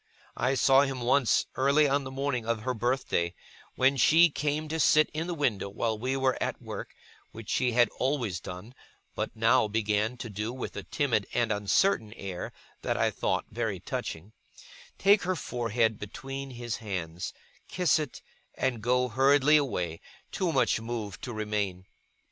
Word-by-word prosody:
I 130 +3 +1
saw 135 +1 +5
him 135 -3 -1
once, 125 -1 +3
early 140 +3 +4
on 140 0 +1
the - - -5
morning 135 -2 -2
of 115 -1 -1
her 130 +1 -1
birthday, 115 -8 -1 0.4
when 135 +2 +3
she 165 +6 +6
came 150 +2 -1
to 160 +1 -2
sit 155 0 +4
in 160 +2 -3
the 175 - -2
window 110 - 0
while 110 +2 -1
we 130 +5 -2
were 130 -1 +1
at - - -2
work - - -7 0.4
(which 115 -1 -7
she 125 -2 +1
had 120 0 +5
always 125 -10 0
done, 90 +7 -9 0.4
but - - -4
now 115 +1 +4
began 110 +2 0
to 120 - -6
do 105 +2 -4
with 130 - -6
a - - -4
timid 125 -9 0
and 120 -2 +2
uncertain 105 - +1
air 95 -5 -6 0.3
that - - -1
I - - +2
thought - - -1
very 110 -4 -2
touching), 85 +4 -5 0.6
take 200 +1 +5
her 185 +1 -1
forehead 115 -6 0
between 135 +6 -6
his 120 -2 -4
hands, 90 -5 -4 0.4
kiss 180 -5 +2
it, 150 -4 -6 0.3
and 125 -4 -1
go 125 +2 +2
hurriedly 135 +4 +4
away, 90 - -2 0.3
too 180 -3 0
much 110 - +2
moved 110 -5 -5
to 125 - -5
remain. 105 -4 -2
120 Hz, 165 wpm, -28 LUFS, 105-135 Hz, 0.6 s, she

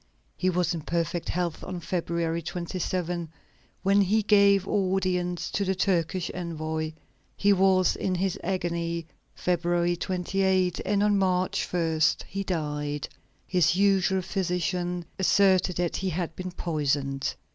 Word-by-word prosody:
He 185 - +1
was 180 0 +1
in 165 - -4
perfect 170 +1 -2
health 175 -2 -2
on 185 -1 -5
February 170 -1 -2
27, 175 0 -3 0.5
when 200 +1 +4
he 210 +3 +2
gave 200 -2 +5
audience 185 -3 0
to 200 - 0
the 190 0 0
Turkish 180 -2 0
envoy; 160 -2 -3 0.4
he 205 0 +4
was 190 -1 +3
in 185 - -1
his 185 0 0
agony, 170 -2 -2 0.3
February 175 0 +1
28, 185 0 0
and 200 +1 +2
on 205 -1 +3
March 185 -1 0
1, 165 -3 0 0.3
he 195 +1 -3
died. 150 -5 -3 0.4
His 180 -1 +2
usual 190 -1 +3
physician 180 -1 -1
asserted 190 -1 +4
that 175 -1 -1
he 190 - -1
had 170 -1 -3
been 185 0 -5
poisoned. 145 -5 -1
180 Hz, 130 wpm, -27 LUFS, 170-190 Hz, 0.5 s, gave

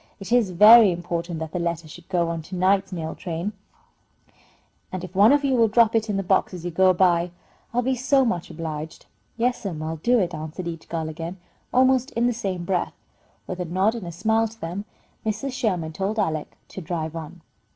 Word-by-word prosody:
It 195 +2 -8
is 240 -5 +4
very 210 +3 +8
important 170 0 -3
that 160 -1 -5
the 180 - -3
letter 170 -1 -2
should 170 +3 -13
go 175 -3 +1
on 165 -1 -3
to 185 - -5
night's 190 +2 +2
mail 160 -3 -4
train, 175 +3 -4 1.4
and 185 -1 -5
if 185 -1 -8
one 200 +5 +6
of 290 0 +3
you 270 - +2
will 230 -3 +4
drop 225 +1 +4
it 225 -1 +1
in 200 - 0
the 195 - -1
box 190 0 +1
as 175 -1 -8
you 175 - -2
go 185 +2 +4
by, 175 -1 +3 0.4
I'll 245 +1 0
be 260 +2 +1
so 260 +2 +2
much 180 -8 -2
obliged." 160 -2 -6 0.3
"Yes'm, 215 -9 -1
I'll 160 +1 -3
do 240 +10 +2
it," 180 -5 0
answered 155 +3 -6
each 165 -1 -7
girl 165 -2 -2
again, 165 +3 -6 0.3
almost 260 +1 +3
in 235 +1 +1
the 245 - +2
same 190 -6 -3
breath. 180 -1 -1 0.5
With 185 - -6
a 180 - -2
nod 190 +6 +1
and 225 -7 -6
a - - -5
smile 220 +6 +1
to 225 +1 -15
them, 180 +5 -5 0.4
Mrs. 220 +5 -2
Sherman 180 -10 -1
told 195 +5 -2
Alec 160 -7 -2
to 190 - -7
drive 160 -1 -4
on. 165 +1 -8
185 Hz, 210 wpm, -24 LUFS, 170-220 Hz, 1.4 s, very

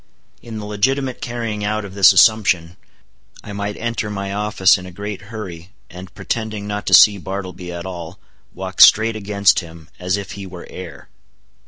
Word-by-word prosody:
In 115 -2 -8
the 105 - -6
legitimate 130 +5 -1
carrying 115 -3 -4
out 105 0 -2
of 95 - -10
this 100 -1 +7
assumption, 95 -6 +3 0.7
I 105 - -8
might 100 +1 -4
enter 115 -2 -3
my 100 -1 -4
office 105 -2 +3
in 90 - -10
a - - -10
great 100 +2 -6
hurry, 95 -5 -8 0.2
and 90 +2 -10
pretending 110 -2 -4
not 105 0 -5
to - - +7
see 105 -2 +7
Bartleby 95 -2 -6
at 85 0 -7
all, 90 -1 -7 0.3
walk 95 0 -4
straight 110 +1 +7
against 100 -2 +2
him 80 -3 -12
as 90 +2 -1
if 100 -1 -7
he 100 -1 -8
were 90 -1 -10
air. 90 -3 -10
100 Hz, 175 wpm, -19 LUFS, 90-105 Hz, 0.7 s, this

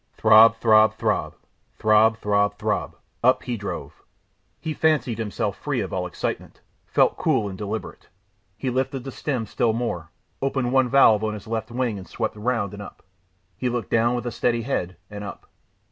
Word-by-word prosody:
Throb, 110 +1 +7
throb, 110 -1 +4
throb - - -1 0.4
throb, 110 +1 +4
throb, 105 -1 +1
throb; - - -2 0.3
up 130 +2 +4
he 125 - -3
drove. 100 -2 -6 0.6
He 160 - -4
fancied 150 -8 +1
himself 105 -3 -2
free - - -2
of - - -5
all - - -1
excitement, - - -5 0.3
felt - - +2
cool 105 - +1
and 95 - -6
deliberate. 105 +2 -6 0.5
He 130 +1 -2
lifted 130 0 -2
the 135 - -6
stem 130 -6 -3
still 110 +2 0
more, 100 -9 -3 0.3
opened 135 -2 -1
one 130 -2 +3
valve 115 -5 +5
on 110 -1 -1
his 105 - -9
left 110 0 -3
wing 120 -4 -2
and 95 - -11
swept 110 -2 -3
round 105 -2 -1
and 100 - -8
up. 100 - -11 0.5
He 125 - -2
looked 120 -4 -3
down 115 +2 +3
with 120 - -4
a 120 - -2
steady 115 0 0
head, 95 -8 -3
and 105 0 -7
up. 100 - -8
115 Hz, 175 wpm, -24 LUFS, 105-125 Hz, 0.6 s, Throb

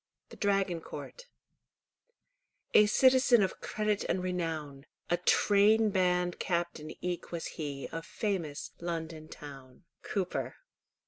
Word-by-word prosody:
THE - - -11
DRAGON 195 -4 +1
COURT - - -9 1.5
"A 210 - +7
citizen 255 0 +5
Of 190 - -3
credit 210 -1 -1
and 185 - -1
renown; 160 -6 -3 0.2
A 175 - +4
trainband 190 -2 +3
captain 170 -3 -2
eke 180 -1 -3
was 170 -1 -4
he 140 -3 -5
Of 165 0 -4
famous 175 -9 -3
London 165 -2 -4
town." 135 -4 -11 0.2
Cowper. 190 -3 -2
180 Hz, 110 wpm, -31 LUFS, 160-205 Hz, 1.5 s, A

